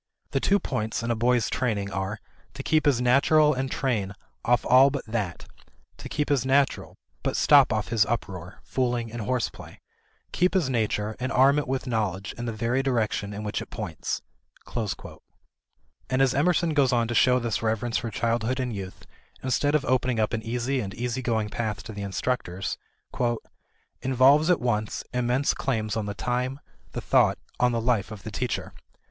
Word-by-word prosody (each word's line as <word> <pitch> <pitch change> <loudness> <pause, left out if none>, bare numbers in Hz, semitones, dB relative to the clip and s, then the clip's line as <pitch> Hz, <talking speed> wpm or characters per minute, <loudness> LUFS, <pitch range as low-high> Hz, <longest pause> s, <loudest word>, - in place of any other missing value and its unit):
The - - +1
two 200 +1 +3
points 110 - -2
in 120 - 0
a - - +1
boy's 120 -1 +2
training 105 -5 -1
are, 95 +2 -3 0.4
to - - -6
keep 155 -1 +2
his 135 -4 +4
naturel 150 +5 +4
and 130 0 -2
train 110 -8 -1 0.3
off 120 0 +2
all 130 +2 +7
but 140 -1 -4
that; 105 -6 -3 0.5
to - - -9
keep 150 -1 -1
his 140 -4 +2
naturel, 135 +1 +1 0.3
but - - -1
stop - - +6
off - - -1
his 115 -2 +4
uproar, 90 -6 -4
fooling, 120 -3 -1
and 120 0 -5
horseplay; 125 +3 -3 0.5
keep 180 +2 +1
his 160 -8 +2
nature 110 -2 -1
and 130 +1 -2
arm 135 +3 +5
it 145 - -3
with 135 +1 -2
knowledge 105 -6 -2
in 120 - -5
the 115 - -2
very 115 +4 0
direction 110 -5 0
in 105 +1 -6
which 105 - -2
it - - -8
points." - - -4 1.9
And 130 - +1
as 135 -1 +4
Emerson 165 +3 +2
goes 140 -3 +3
on 120 -2 +2
to 120 - -2
show 125 +2 +5
this 115 -3 -1
reverence 110 +1 0
for 115 - -4
childhood 115 +3 -1
and 125 -2 -2
youth 95 -2 -7 0.4
instead 145 +3 +1
of 150 - +1
opening 125 -1 +1
up 110 +1 +1
an 110 - -1
easy 125 +4 -1
and 100 -3 -6
easy 125 +2 -2
going 110 -4 0
path 105 -2 -3
to 110 - -8
the 100 - -6
instructors, 95 -1 -2 1.3
"involves 135 +5 +4
at 180 - +4
once, 110 -3 -1
immense 125 +3 +1
claims 110 -5 -1
on 110 -2 -2
the 100 - -4
time, 125 +4 -2 0.3
the - - -3
thought, - - +3 0.2
on 125 0 +4
the 115 - 0
life 115 -4 +1
of 105 -2 -9
the 110 - -6
teacher. 125 +4 -3
120 Hz, 180 wpm, -26 LUFS, 110-130 Hz, 1.9 s, all